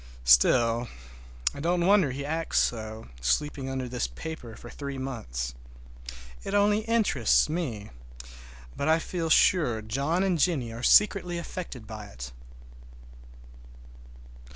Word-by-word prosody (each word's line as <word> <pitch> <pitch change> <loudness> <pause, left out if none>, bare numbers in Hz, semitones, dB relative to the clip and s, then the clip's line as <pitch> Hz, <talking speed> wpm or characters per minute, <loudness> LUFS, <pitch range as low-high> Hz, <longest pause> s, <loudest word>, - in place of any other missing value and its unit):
Still, 115 - +4 0.7
I - - -9
don't 175 +3 +1
wonder 195 -6 +4
he 140 +2 -5
acts 160 +2 -2
so, 110 -1 -1
sleeping 135 - -1
under 130 -1 -3
this 125 0 -2
paper 160 -9 -8
for 120 - -12
three 140 -1 -6
months. 65 - -4 0.9
It - - -3
only 205 +1 +4
interests 220 - +3
me, 140 -11 -4 0.8
but 140 - -2
I 160 +1 +5
feel 165 0 -3
sure 150 -8 +4
John 140 - 0
and 185 -4 +1
Jennie 135 -9 +1
are 115 - -7
secretly 180 +1 +4
affected 170 -8 -7
by 110 -1 -8
it. - - -9
135 Hz, 125 wpm, -27 LUFS, 115-170 Hz, 0.9 s, I